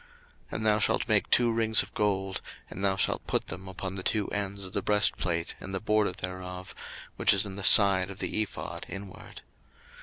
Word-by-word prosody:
02:028:026 485 - -26 0.5
And 110 - -3
thou 105 0 +3
shalt - - 0
make - - +1
two 120 -1 +3
rings 110 -1 +3
of - - -15
gold, 95 -2 -1 0.3
and 95 - -7
thou 95 -1 +2
shalt - - -1
put - - -1
them 95 +1 -7
upon 95 0 -5
the 95 - -6
two 105 +2 -1
ends 100 -1 -4
of 95 - -11
the 100 - -1
breastplate 95 -5 0
in 95 - -7
the 95 - -2
border 105 -1 +1
thereof, 90 0 -8 0.4
which - - +4
is 100 - +3
in 95 -1 -7
the 100 - -6
side 95 -1 +7
of 100 - -9
the 110 - -2
ephod 110 - -6
inward. 100 -1 -10
100 Hz, 205 wpm, -28 LUFS, 95-105 Hz, 0.5 s, side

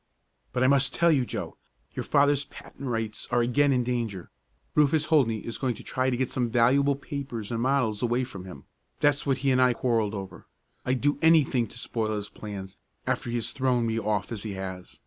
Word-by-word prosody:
"But 125 - 0
I - - +5
must 135 0 +3
tell 170 0 +4
you, 135 -5 +2
Joe. - - -5 0.4
Your - - -3
father's 145 -1 +3
patent 140 -2 -9
rights 115 -2 -3
are 120 0 +2
again 140 +4 +3
in 125 -2 +2
danger. 115 -7 -3 0.4
Rufus 150 +1 +3
Holdney 125 -9 +2
is 115 - -4
going 130 -3 0
to - - -11
try 130 0 0
to 125 - -1
get 130 0 -1
some 125 -2 0
valuable 130 +4 +3
papers 135 -7 -6
and 115 0 -1
models 125 -5 +1
away 120 +1 +1
from 100 -7 -8
him. 95 - -10 0.4
That's 145 0 +2
what 135 -2 +2
he 135 - +4
and 130 0 +3
I 125 -1 +5
quarreled 115 -4 0
over. 95 -3 -8 0.4
I'd 130 0 +1
do 145 0 +1
anything 150 -7 +4
to 115 - -8
spoil 110 -3 -2
his 105 0 -4
plans, 100 -2 -8 0.3
after - - -1
he 120 - -2
has 115 - -2
thrown 125 -3 +1
me 115 0 0
off 105 -2 -1
as 110 -4 -3
he 105 -2 -4
has. 95 -1 -7
125 Hz, 210 wpm, -27 LUFS, 110-140 Hz, 0.4 s, I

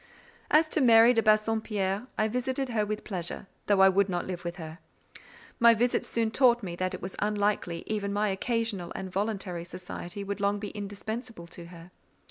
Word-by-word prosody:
As 310 +1 +5
to 310 - +1
Mary 230 -1 +7
de 225 - +3
Bassompierre, 215 -1 +1
I 215 - +2
visited 255 +3 -2
her 215 -3 0
with 210 0 -4
pleasure, 180 -1 -5 0.2
though 200 -2 +4
I 190 - +8
would 195 +1 +2
not 175 -1 -2
live 180 -1 -5
with 170 0 -4
her. 160 -1 -9 0.8
My 235 0 +7
visits 240 +2 +1
soon 225 -1 0
taught 240 -2 +4
me 175 -3 -4
that 185 0 -2
it - - -11
was 185 - -6
unlikely 205 -4 -1
even 205 -2 -2
my 205 +1 +1
occasional 205 -3 -2
and 190 -1 -5
voluntary 190 -3 -2
society 180 +2 -7
would 200 +1 -4
long 200 0 +1
be 205 0 -5
indispensable 210 0 -6
to 170 -1 -9
her. 170 0 -13
205 Hz, 185 wpm, -28 LUFS, 185-225 Hz, 0.8 s, I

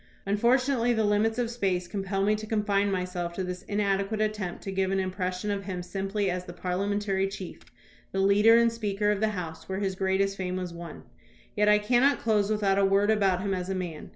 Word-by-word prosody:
Unfortunately, 240 +4 +2
the 220 -1 +1
limits 210 +2 +2
of 240 -2 -1
space 190 -6 -1
compel 195 0 -2
me 210 +2 +3
to 215 0 -4
confine 205 -2 +1
myself 180 -2 -3
to 190 - -3
this 180 0 -5
inadequate 200 +1 -1
attempt 215 -4 -2
to 195 - -4
give 190 0 0
an 195 0 +1
impression 185 +1 -2
of 200 -1 -3
him 180 -2 -4
simply 195 +3 -2
as 180 0 -2
the 175 - -8
parliamentary 195 +2 -1
chief, 195 -2 -8 0.5
the - - -4
leader 205 +4 +5
and 235 0 +4
Speaker 210 -2 -1
of 205 - -1
the 220 - +2
House, 175 -6 -6
where 190 - -2
his 195 -2 -1
greatest 195 +1 0
fame 185 -1 -3
was 180 -2 -4
won. 170 0 -9 0.5
Yet 210 -1 +3
I 210 - +6
can 240 +4 +2
not 280 +1 +4
close 210 -3 +1
without 200 -2 +2
a - - +3
word 200 +2 +3
about 195 -4 +2
him 195 0 -1
as 180 0 -3
a 190 - -1
man. 175 -4 -5
195 Hz, 215 wpm, -27 LUFS, 185-210 Hz, 0.5 s, I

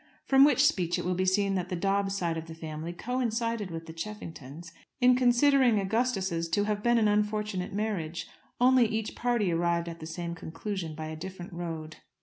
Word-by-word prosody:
From 270 0 +6
which 285 -1 +5
speech 180 - +2
it - - -4
will 180 - +1
be 185 +1 0
seen 195 +1 +2
that 180 -2 -2
the 180 - -2
Dobbs 195 +2 0
side 170 -3 -1
of 160 0 -5
the 165 - -8
family 160 0 -6
coincided 230 0 -2
with 165 -1 -6
the 160 - -9
Cheffingtons 165 -4 -8 0.3
in 250 -1 +6
considering 250 -1 +4
Augustus's 195 -5 0
to 205 +4 +2
have 205 0 -1
been 240 +2 +3
an 220 -2 +4
unfortunate 210 -2 0
marriage; 195 -6 -3 0.3
only 250 -1 +5
each 220 0 -3
party 235 -6 0
arrived 170 0 +1
at 170 0 -7
the 160 - -7
same 170 +1 -4
conclusion 165 0 -5
by 155 0 -5
a 155 0 -5
different 180 +1 -8
road. 160 -3 -6
190 Hz, 190 wpm, -29 LUFS, 170-220 Hz, 0.3 s, From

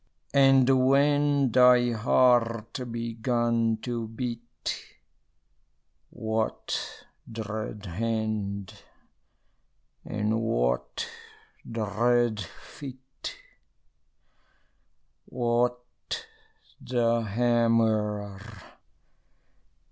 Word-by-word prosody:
And, 135 -2 +6 0.2
when 145 -1 +3
thy 125 0 +6
heart 115 +1 +2
began 115 0 0
to 120 -2 -3
beat, 120 +1 -5 1.2
What 110 0 -3 0.3
dread 110 -1 -5
hand 105 0 -2 1.3
and 105 +2 -1
what 60 - -1 0.6
dread 115 +1 +1
feet? 130 - -9 1.9
What 120 0 +1 1.1
the 115 -2 +1
hammer? 110 -3 +1
115 Hz, 50 wpm, -27 LUFS, 110-125 Hz, 1.9 s, And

